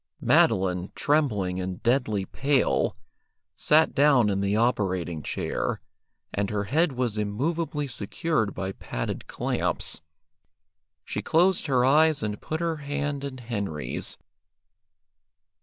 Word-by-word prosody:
Madeline, 90 -1 +2
trembling 105 -12 +1
and 90 0 -5
deadly 115 -5 +1
pale, 140 +6 +1 0.6
sat 155 +1 +4
down 135 -7 +4
in 100 0 0
the 100 +1 +1
operating 95 -8 0
chair, - - -2 0.5
and 100 0 -1
her 105 -1 -1
head 155 - +1
was 120 -4 -1
immovably 150 +8 -1
secured 115 0 -1
by 95 0 -3
padded - - -5
clamps. - - -1 1.0
She - - -3
closed 175 +2 +2
her 125 -3 +3
eyes 155 0 +4
and 105 -1 -3
put 155 +1 -3
her 165 -1 -1
hand 145 -1 -3
in 140 -2 -5
Henry's. 100 - -3
120 Hz, 115 wpm, -26 LUFS, 100-145 Hz, 1.0 s, sat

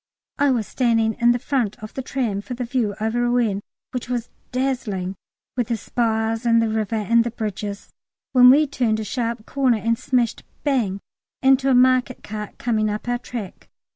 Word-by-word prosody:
I 285 0 +4
was 240 -5 +1
standing 225 -2 +1
in 235 0 +5
the 240 - +2
front 245 -5 -1
of 215 0 -9
the 265 - -3
tram 240 -6 -2
for 245 +4 -6
the 250 - -3
view 230 -4 -1
over 220 +3 0
Rouen, 230 -5 +1 0.3
which 250 -1 -5
was 240 -2 -3 0.2
dazzling, 245 -8 -1 0.4
with 245 -3 0
the 235 - -1
spires 225 +1 -1
and 230 -1 +4
the 225 -1 +1
river 220 0 -1
and 230 +2 +3
the 235 - -2
bridges, 210 -3 -5 0.4
when 250 -1 +8
we 290 +4 +6
turned 240 -6 0
a - - -2
sharp 230 0 -3
corner 260 -4 +2
and 230 +2 0
smashed 245 -3 0 0.2
bang 230 -9 0 0.4
into 265 0 +4
a 260 - +5
market 255 0 +3
cart 210 0 -6
coming 215 -3 0
up 210 +3 -4
our 245 0 0
track. 235 -6 -8
235 Hz, 185 wpm, -22 LUFS, 215-250 Hz, 0.4 s, when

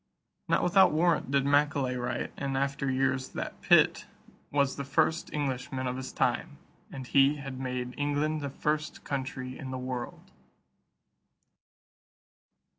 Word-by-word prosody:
Not - - +2
without 190 +2 +5
warrant 165 -2 +2
did 140 0 +2
Macaulay 140 -2 +2
write 120 0 -3
in 135 -1 -3
after 140 0 -1
years 130 0 0
that - - -5
Pitt - - +4 0.4
"was 140 -1 +1
the 140 - -4
first 160 +4 +1
Englishman 130 -2 -2
of 125 0 -2
his 130 0 -6
time; - - -1 0.3
and 130 -1 -7
he 140 +3 +4
had 135 -3 -7
made 125 -1 -3
England 145 +2 0
the 140 - -3
first 150 +2 -2
country 130 -2 -4
in 135 - -6
the 130 - -4
world." 125 -1 -6
135 Hz, 135 wpm, -29 LUFS, 130-145 Hz, 0.4 s, without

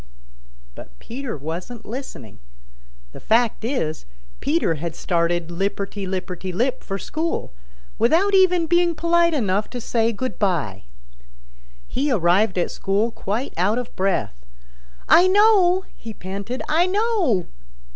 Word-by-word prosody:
But - - -13
Peter 250 - -6
wasn't 175 - -6
listening. 215 - -8 0.7
The - - -11
fact 230 0 +1
is, 190 - -2 0.3
Peter 290 - +1
had 165 +1 -5
started 170 -1 0
lipperty 195 +2 -3
lipperty 185 0 -4
lip 245 +8 -1
for 195 - -4
school, 320 - -3 0.5
without 335 - +3
even 360 -3 +4
being 345 0 +2
polite 340 0 +3
enough 210 -5 0
to 245 - -5
say 230 0 0
good 255 +4 -5
by. 150 - -1 1.0
He 280 +3 -1
arrived 190 -1 +2
at 175 - 0
school 205 +4 0
quite 225 +5 -3
out 200 +6 +2
of 245 -1 -5
breath. 185 - -1 0.6
"I 355 +2 +7
know!" 380 -2 +4
he 225 -1 -9
panted. 200 +7 -5
"I 330 +4 +3
know!" 375 - +1
225 Hz, 125 wpm, -22 LUFS, -, 1.0 s, I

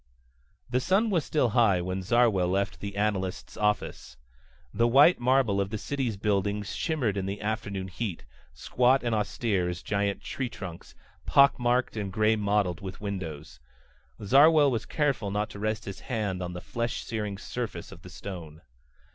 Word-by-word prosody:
The 125 +1 +1
sun 200 - +2
was 170 -6 +2
still 140 -5 +1
high 110 -5 +3
when 95 +2 -3
Zarwell 110 -2 +3
left 100 +2 -1
the 100 -1 -6
analyst's 100 -3 -2
office. 105 -11 -2 0.6
The 115 - +3
white 140 +8 +6
marble 120 -5 +2
of 100 - -2
the 110 - -3
city's 125 -3 -3
buildings 100 0 -1
shimmered 130 - -1
in 95 -1 -2
the 100 +1 -4
afternoon 100 -3 -3
heat, 95 - -5 0.3
squat 125 +2 +2
and 120 -1 0
austere 105 -3 0
as 90 -1 -5
giant 100 -1 -1
tree 130 -2 -3
trunks, 90 -7 -9 0.3
pock 140 -1 +5
marked 125 0 +1
and 100 -3 -3
gray 110 +3 +3
mottled 100 -4 0
with 95 -1 -7
windows. 85 -8 -6 0.6
Zarwell 145 +5 +6
was 115 -3 -2
careful 140 -9 0
not 105 +2 -2
to 100 - -9
rest 110 +1 -2
his 100 - -7
hand 105 -6 -3
on 90 0 -4
the 90 - -6
flesh 115 0 -3
searing 105 -3 -3
surface 120 +2 -5
of - - -12
the - - -11
stone. 85 -5 -9
105 Hz, 165 wpm, -28 LUFS, 95-120 Hz, 0.6 s, white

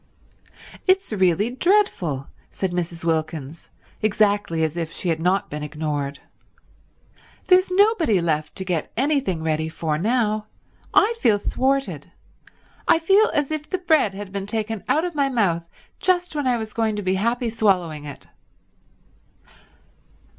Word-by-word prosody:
"It's 375 - +2
really 190 +3 +2
dreadful," 250 - +1 0.2
said 190 -2 -3
Mrs. 170 -1 -4
Wilkins, 160 -2 -3 0.3
exactly 205 -6 +1
as 160 0 -1
if 165 -2 -3
she 180 - -4
had 165 -1 0
not 185 +3 +1
been 150 +1 -4
ignored. 150 -2 -3 1.3
"There's 370 0 +4
nobody 370 - +3
left 155 -3 -1
to 190 - -4
get 175 -4 -2
anything 265 - 0
ready 160 0 0
for 155 -1 -2
now. 215 0 0 0.4
I 410 +3 +4
feel 215 - +4
thwarted. 270 +6 -1 0.8
I - - +6
feel 390 +6 +4
as 295 0 0
if 310 -1 -4
the 370 - 0
bread 315 - +2
had 200 -1 -7
been 200 0 -4
taken 220 -1 -3
out 315 +4 +2
of 355 - -4
my 280 -2 +1
mouth 170 -9 0 0.3
just 360 -3 +1
when 290 -3 -1
I 245 -1 +2
was 220 -2 -6
going 225 -2 0
to 205 - -4
be 185 0 +1
happy 235 +4 0
swallowing 180 -9 +1
it." 145 - -9
205 Hz, 145 wpm, -23 LUFS, 165-275 Hz, 1.3 s, I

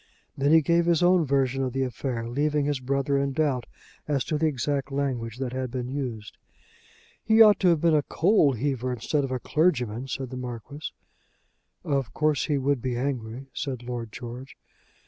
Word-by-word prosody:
Then 140 +2 +1
he 160 -1 +6
gave 170 +2 +2
his 170 0 +3
own 175 -3 +4
version 135 -1 +1
of 130 -2 -2
the 135 0 0
affair, 125 -2 -3
leaving 145 +4 0
his 145 -2 0
brother 140 +2 0
in 140 0 -1
doubt 135 -5 0 0.4
as 140 -3 +1
to 155 -2 -2
the 160 - +3
exact 140 0 -2
language 125 -5 -2
that 130 -2 -3
had 130 -1 -2
been 125 0 -4
used. 125 -7 -5 0.9
"He 220 0 +3
ought 215 -2 +8
to 190 - +3
have 170 -4 +4
been 170 -1 +4
a 150 - +4
coal 160 -2 +3
heaver 130 0 -2
instead 135 +5 -1
of 135 - -2
a 130 - -1
clergyman," 125 -7 0
said 130 -1 -4
the 130 - -5
Marquis. 125 +4 -6 0.9
"Of 135 - -1
course 150 -2 +1
he 150 -3 0
would 135 -1 0
be 125 -1 -2
angry," 130 0 -4
said 130 -4 -4
Lord 120 -2 -5
George. 125 +1 -8
135 Hz, 185 wpm, -26 LUFS, 125-150 Hz, 0.9 s, ought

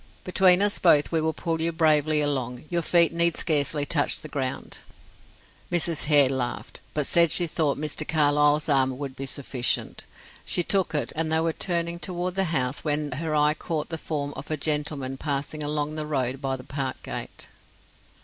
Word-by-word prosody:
"Between 185 +1 +4
us 205 0 +1
both 150 -5 +4
we 165 -1 +1
will 160 0 0
pull 165 0 -3
you 165 +1 0
bravely 155 -2 +2
along; 130 -3 -2
your 175 -1 0
feet 170 0 +3
need 170 0 +2
scarcely 150 -2 +2
touch 145 0 +1
the 155 - -8
ground." 135 -3 -4 0.9
Mrs. 170 -2 0
Hare 145 -3 +5
laughed, 125 -2 -4
but 150 -2 0
said 170 +1 +4
she 175 - +3
thought 155 -3 0
Mr. 155 +1 -2
Carlyle's 150 0 +3
arm 130 -3 +2
would 135 -2 -6
be 135 - -6
sufficient. 130 -2 -2 0.4
She 175 - 0
took 190 -3 +1
it, 150 - -2
and 160 0 0
they 160 - +3
were 165 0 0
turning 170 -1 -1
toward 180 0 -3
the 195 +1 +1
house, 135 -6 -1
when 150 -1 -1
her 155 +4 -3
eye 150 0 +3
caught 155 0 -4
the 165 - -4
form 145 -3 -4
of 135 - -8
a 155 - -1
gentleman 145 -3 -2
passing 145 +1 -3
along 150 0 -2
the 155 -1 -4
road 135 -2 -2
by 135 -1 -1
the 125 - -11
park 135 -2 -5
gate. - - -6
150 Hz, 185 wpm, -25 LUFS, 140-165 Hz, 0.9 s, Hare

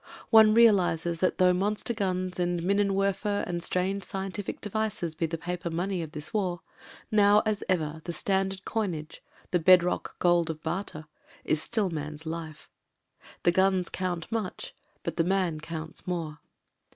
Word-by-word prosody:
One 220 -1 +7
realises 175 -7 +4
that 185 - +1
though 180 0 +5
monster 205 +5 -1
guns 185 -4 -2
and 175 -1 0
minenwerf 195 0 +1
er 205 -1 0
and 175 -1 -3
strange 185 +3 -1
scientific 195 +2 -4
devices 215 -5 -2
be 165 +1 -1
the 165 +1 -3
paper 180 +1 -4
money 180 +2 -2
of 155 -2 -7
this 150 +7 -5
war, 180 -5 -1 0.5
now 210 0 +5
as 215 -2 0
ever 160 -3 0
the 175 - -3
standard 190 +2 -1
coinage 175 -9 -3 0.2
— - - -29
^the 175 -3 +1
bedrock 180 0 +4
gold 175 -2 +3
of 155 -1 -5
barter 175 -5 -4 0.2
— - - -25
^is 155 - +3
still 200 +4 0
man's 150 0 -5
life. 160 -1 -6 0.8
The 175 - +5
guns 190 0 +2
count 180 -1 -3
much 220 -5 -4 0.2
— - - -40
but - - -4
the 165 - +3
man 180 -3 0
counts 160 +1 -7
more. 165 -4 -3
180 Hz, 165 wpm, -28 LUFS, 165-195 Hz, 0.8 s, One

